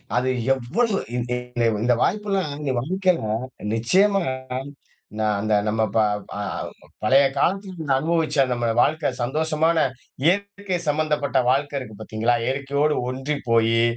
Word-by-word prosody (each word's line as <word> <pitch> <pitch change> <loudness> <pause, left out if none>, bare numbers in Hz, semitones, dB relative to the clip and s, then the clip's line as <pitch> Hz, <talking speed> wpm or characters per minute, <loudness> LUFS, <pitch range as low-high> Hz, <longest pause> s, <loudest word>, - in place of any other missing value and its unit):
அது 125 +1 +1 0.2
எவ்வளவு 195 - 0 0.2
இந்த 125 0 -3 0.2
இந்த 120 -1 -2 0.2
இந்த 120 +1 +4
வாய்ப்புல்லாம் 195 -6 0
இந்த 140 -3 -1
வாழ்க்கையில 185 - +1 0.5
நிச்சயமா 195 - +3 1.0
நா 110 - +1
அந்த 110 +1 0
நம்ம 110 +1 0
ப - - +4 0.4
அ - - -4 0.6
பழைய 135 +5 +5
காலத்துல 190 +4 0
நம்ம 140 -4 +1
அனுபவிச்ச 155 -3 +2
நம்ம 120 -1 0
வாழ்க்கை 155 +1 +2
சந்தோஷமான, 160 +4 +1 0.5
இயற்கை 200 +1 0
சம்பந்தப்பட்ட 150 -2 0
வாழ்க்கை 145 +2 +1
இருக்கு 110 -5 -9
பாத்தீங்களா? 110 +2 0
இயற்கையோடு 140 +3 0
ஒன்றிப்போயி, 120 -4 +1
145 Hz, 120 wpm, -23 LUFS, 125-170 Hz, 1.0 s, பழைய